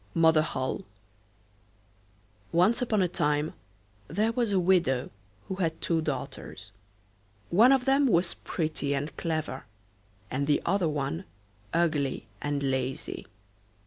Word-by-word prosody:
MOTHER 160 -1 +5
HOLLE 130 -4 -2 1.7
Once 180 +9 +4
upon 215 -5 +2
a - - +2
time 150 -3 0 0.5
there 215 +7 +1
was 230 -2 0
a 195 - +3
widow 175 -8 +2 0.4
who 190 - -4
had 165 -3 -1
two 165 -1 +1
daughters; 125 -8 -5 0.8
one 225 +9 +7
of 265 -2 +3
them 275 +1 +4
was 175 -5 +3
pretty 155 -4 -2
and 145 +3 -3
clever, 155 -5 -3 0.7
and 140 +2 -1
the 150 - +3
other 150 - 0 0.5
ugly 155 -5 0 0.2
and 145 -1 -1
lazy. 130 -1 -2
160 Hz, 115 wpm, -28 LUFS, 140-190 Hz, 1.7 s, one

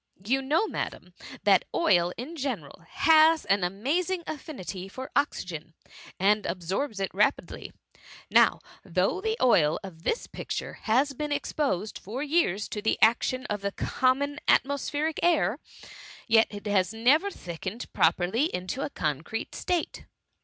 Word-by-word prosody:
You 265 +5 +2
know. 300 +10 +2
Madam, - - -5 0.3
that - - +5
oil 175 - +3
in 270 +9 -6
general 275 -4 -5
has 320 0 +5
an 195 -1 +2
amazing 310 - -1
affinity 230 - -6
for 260 +7 -8
oxygen, 165 - -2 0.4
and 205 +2 +3
ab 175 +2 -3
sorbs 200 - -2
it 195 - -2
rapidly; 210 +8 0 0.6
now, - - +4 0.2
though 185 - 0
the 445 +2 -1
oil 160 -12 +4
of 175 -4 -10
this 455 - -1
picture - - -5 0.2
has 270 +6 +3
been 295 +2 -4
exposed 280 - -1
for 240 +8 -5
years 285 - +1
to 210 - -4
the 220 - +1
action 255 +4 +3
of 210 -5 -3
the 200 0 -2
common 285 +3 0
atmospheric 290 +3 +1
air, 295 - +2 0.7
yet 225 0 +5
it 205 0 -9
has 205 0 +1
ne 245 +6 +5
ver 400 +5 -4
thickened 190 - -6
properly 175 - +2
into 185 - -3
a - - -2
concrete 155 - -3
state."" 355 -3 -2
230 Hz, 145 wpm, -27 LUFS, 190-290 Hz, 0.7 s, that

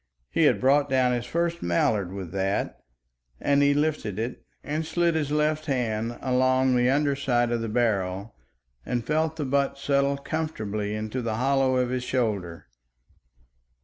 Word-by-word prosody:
He - - +3
had - - +4
brought 140 +2 +3
down 130 -1 +3
his 120 -1 -2
first 170 0 -1
mallard 90 +2 +1
with 95 -3 -6
that, 95 +1 -1 0.6
and 140 0 +2
he 145 0 +4
lifted 145 -10 -1
it 115 +3 -4 0.2
and 155 +2 -2
slid 170 +1 +1
his 155 -3 -1
left 150 +1 0
hand 120 -3 -1
along 130 0 +2
the 125 0 +3
under 140 +1 +2
side 120 -3 +1
of 120 -1 0
the 115 - -3
barrel 105 -3 -1 0.5
and 120 - -2
felt 155 +2 0
the 155 -3 -3
butt 140 +1 0
settle 140 0 +1
comfortably 110 -10 -3
into 110 +4 -3
the 115 -2 -2
hollow 135 +2 +2
of 125 -1 +1
his 125 -1 -2
shoulder. 105 -10 -2
130 Hz, 160 wpm, -26 LUFS, 110-145 Hz, 0.6 s, had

